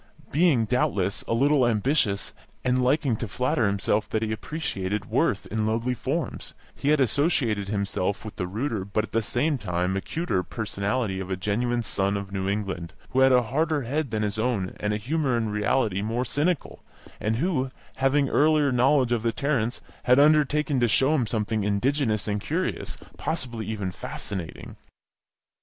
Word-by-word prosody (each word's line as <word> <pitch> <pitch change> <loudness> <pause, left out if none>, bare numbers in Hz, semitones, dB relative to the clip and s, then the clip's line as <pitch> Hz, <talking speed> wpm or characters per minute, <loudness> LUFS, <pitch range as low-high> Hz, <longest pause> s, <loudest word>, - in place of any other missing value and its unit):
Being, 145 -7 +3
doubtless, 100 -5 0
a - - 0
little 135 0 +4
ambitious, 110 -3 +1 0.3
and 125 0 +2
liking 130 -1 +2
to 115 - -4
flatter 120 +1 +1
himself 100 +1 0
that 110 0 0
he 110 - -2
appreciated 105 -5 -3
worth 115 -3 +1
in 110 0 0
lowly 115 +3 0
forms, 140 +7 -3 0.2
he 140 - -2
had 150 0 +4
associated 125 - +1
himself 100 0 -1
with 110 - -7
the 90 -3 -2
ruder 110 +1 -2
but 100 +2 -1
at 110 - -8
the 115 - +1
same 135 +6 0
time 90 -2 -1
acuter 100 - -1
personality 100 +1 -2
of 95 -1 -5
a 95 - 0
genuine 120 +6 0
son 100 -1 0
of 100 -1 -6
New 95 0 -2
England, 95 -5 -3 0.2
who 130 - +1
had 130 0 +6
a 125 -1 +5
harder 150 +5 0
head 140 +4 -1
than 110 -1 -1
his 105 0 -2
own 110 -6 -1
and 105 - -1
a 105 - 0
humour 135 +2 0
in 110 -2 -1
reality 105 -1 +1
more 115 +4 -1
cynical, 150 +6 -1 0.4
and 110 +1 0
who, 135 -1 0 0.3
having 140 +1 +3
earlier 150 0 +3
knowledge 130 0 +3
of 120 -2 +1
the 115 +1 +1
Tarrants, 125 -4 -1 0.2
had 125 +1 +5
undertaken 150 -1 +4
to 120 - +3
show 135 +6 +3
him 130 -7 +1
something 110 -1 -1
indigenous 110 +1 +1
and 105 -1 -1
curious, - - -2 0.2
possibly 130 -8 -3
even 100 -4 -3
fascinating. 90 -1 -6
115 Hz, 170 wpm, -26 LUFS, 105-135 Hz, 0.4 s, had